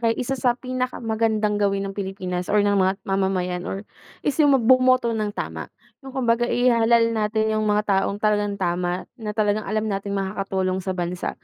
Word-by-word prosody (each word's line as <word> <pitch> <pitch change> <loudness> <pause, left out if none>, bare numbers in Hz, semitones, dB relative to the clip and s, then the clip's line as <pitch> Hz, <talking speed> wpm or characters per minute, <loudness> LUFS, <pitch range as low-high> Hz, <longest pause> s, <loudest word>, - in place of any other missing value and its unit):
kay 230 -1 +1
isa 255 +1 -2
sa 245 -2 +1
pinaka 255 0 -3
magandang 220 -2 0
gawin 200 -1 +1
ng 195 - -4
Pilipinas 185 -2 -4
or 205 0 +3
ng 205 - +2
mga 190 -1 +3
mamamayan 190 -2 -1
or 195 +2 -5 0.4
is 290 - +2
yung 290 -2 +6
mag 240 - -2
bumoto 255 -1 +4
ng 215 -2 -1
tama. - - -5 0.3
Yung 270 -1 -10
kumbaga 240 -1 +1
ihalal 235 -1 +3
natin 220 0 0
yung 215 0 0
mga 210 0 +2 0.2
taong 200 - -2
talagang 205 -1 0
tama. 180 -1 -1 0.2
Na 210 -1 -5
talagang 210 -1 0
alam 215 +1 0
nating 200 -1 -2
makakatulong 190 -1 -2
sa 190 0 -4
bansa, 175 0 -3
210 Hz, 185 wpm, -23 LUFS, 195-230 Hz, 0.4 s, yung